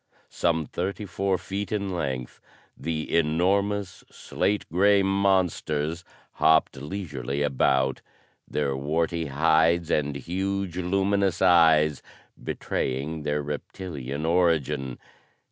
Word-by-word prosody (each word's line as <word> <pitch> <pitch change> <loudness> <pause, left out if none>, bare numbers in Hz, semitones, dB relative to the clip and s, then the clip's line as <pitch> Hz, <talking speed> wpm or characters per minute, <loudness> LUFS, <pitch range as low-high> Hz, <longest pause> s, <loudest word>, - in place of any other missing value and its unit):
Some 80 -2 0
thirty 100 +7 -4
four 95 0 -1
feet 95 +2 -5
in 100 -3 -2
length, 65 -6 -4 0.3
the 80 +2 -3
enormous, 95 +5 +1
slate 105 0 -2
grey 100 +3 +4
monsters 90 -5 +1 0.3
hopped 80 0 +3
leisurely 70 -3 -4
about, 65 -1 +1 0.5
their 70 -2 -1
warty 80 +4 -1
hides 80 +3 +2
and 75 -1 0
huge 95 +4 -3
luminous 95 +1 +1
eyes 80 -5 +5 0.4
betraying 70 +5 -3
their 75 0 -1
reptilian 75 -1 -5
origin. 80 -7 +1
80 Hz, 95 wpm, -26 LUFS, 75-95 Hz, 0.5 s, eyes